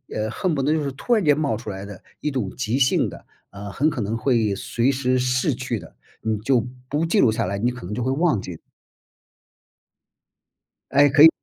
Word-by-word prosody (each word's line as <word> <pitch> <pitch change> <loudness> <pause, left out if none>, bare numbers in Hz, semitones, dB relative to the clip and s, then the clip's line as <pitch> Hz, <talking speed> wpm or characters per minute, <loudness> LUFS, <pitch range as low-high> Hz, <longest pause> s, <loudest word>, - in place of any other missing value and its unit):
呃， 110 0 -1
恨 175 +6 -1
不 135 - -1
得 145 - +2
就 155 -1 +1
是 140 - -2
突 240 - -1
然 215 -4 +3
间 150 -2 +4
冒 140 -8 0
出 110 -1 -8
来 95 -1 -6
的 100 -2 -10 0.2
一 150 - -1
种 125 -8 -2
急 125 +1 -1
性 130 -1 +3
的 - - -12 0.2
啊， 100 +1 -8
很 145 +9 +1
可 150 - -5
能 110 +1 -1
会 115 -4 +1
随 120 +7 0
时 130 -1 +1
逝 125 +3 +1
去 125 -1 -3
的， - - -12 0.3
你 110 -1 -1
就 120 +1 +1 0.2
不 150 +3 0
记 185 +6 +2
录 110 - +4
下 115 +1 -1
来， 100 +2 -2
你 120 +4 +1
可 125 -5 -7
能 100 - -5
就 125 - -3
会 130 +2 0
忘 155 - +2
记。 90 -3 -7 2.3
哎， 145 +1 +5
可 145 +1 +5
以， 160 - +12
125 Hz, 235 characters per minute, -23 LUFS, 110-145 Hz, 2.3 s, 以